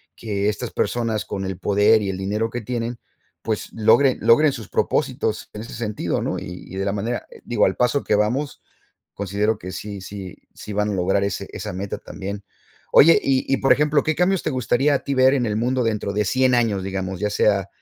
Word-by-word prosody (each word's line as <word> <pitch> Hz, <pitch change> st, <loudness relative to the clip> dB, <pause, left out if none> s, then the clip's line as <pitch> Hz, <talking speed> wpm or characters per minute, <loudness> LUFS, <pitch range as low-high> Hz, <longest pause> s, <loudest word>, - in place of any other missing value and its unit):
que 100 Hz, -3 st, -2 dB
estas 110 Hz, +3 st, -3 dB
personas 115 Hz, -3 st, -1 dB
con 95 Hz, -, -4 dB
el 95 Hz, -1 st, -4 dB
poder 105 Hz, +3 st, +3 dB
y 100 Hz, -, -2 dB
el 95 Hz, -, -3 dB
dinero 105 Hz, +4 st, -1 dB
que 120 Hz, -, -4 dB
tienen, 115 Hz, +1 st, -4 dB, 0.4 s
pues 110 Hz, -2 st, -3 dB
logren 115 Hz, +4 st, +4 dB
logren 145 Hz, +6 st, +5 dB
sus 110 Hz, -6 st, -8 dB
propósitos -, -, -1 dB
en 105 Hz, -, -6 dB
ese 115 Hz, -, -9 dB
sentido, 110 Hz, -2 st, -2 dB
¿no? -, -, -2 dB
Y 90 Hz, 0 st, -8 dB
y -, -, -9 dB
de 95 Hz, -, -1 dB
la 100 Hz, -, 0 dB
manera, 115 Hz, +4 st, -3 dB, 0.2 s
digo, 120 Hz, -, +2 dB
al -, -, +1 dB
paso 125 Hz, +3 st, +1 dB
que -, -, 0 dB
vamos, 120 Hz, +8 st, -1 dB, 0.5 s
considero 100 Hz, +2 st, -1 dB
que 90 Hz, -, -7 dB
sí 100 Hz, +1 st, -6 dB
sí 95 Hz, -1 st, -8 dB, 0.2 s
sí 105 Hz, -, -8 dB
van 105 Hz, +1 st, 0 dB
a -, -, -2 dB
lograr 95 Hz, +2 st, +1 dB
ese 100 Hz, -, -3 dB
esa -, -, -6 dB
meta 95 Hz, +2 st, -4 dB
también. 100 Hz, +1 st, -7 dB, 0.5 s
Oye, 165 Hz, +3 st, +7 dB
y 135 Hz, -1 st, +1 dB
y, 135 Hz, -, +3 dB
por 135 Hz, -, +4 dB
ejemplo, 150 Hz, 0 st, +2 dB
¿qué 155 Hz, -, 0 dB
cambios 185 Hz, +1 st, +2 dB
te -, -, -1 dB
gustaría 130 Hz, +2 st, +1 dB
a 140 Hz, -, -2 dB
ti 140 Hz, -, -2 dB
ver 130 Hz, +1 st, +5 dB
en 130 Hz, -3 st, +1 dB
el 105 Hz, -1 st, -1 dB
mundo 125 Hz, +2 st, 0 dB
dentro 105 Hz, -3 st, -1 dB
de 105 Hz, 0 st, +1 dB
100 130 Hz, +5 st, +2 dB
años, 110 Hz, -5 st, +1 dB
digamos, 95 Hz, -1 st, -4 dB
¿ya 105 Hz, -, +1 dB
sea 100 Hz, -1 st, +2 dB
110 Hz, 215 wpm, -22 LUFS, 100-125 Hz, 0.5 s, Oye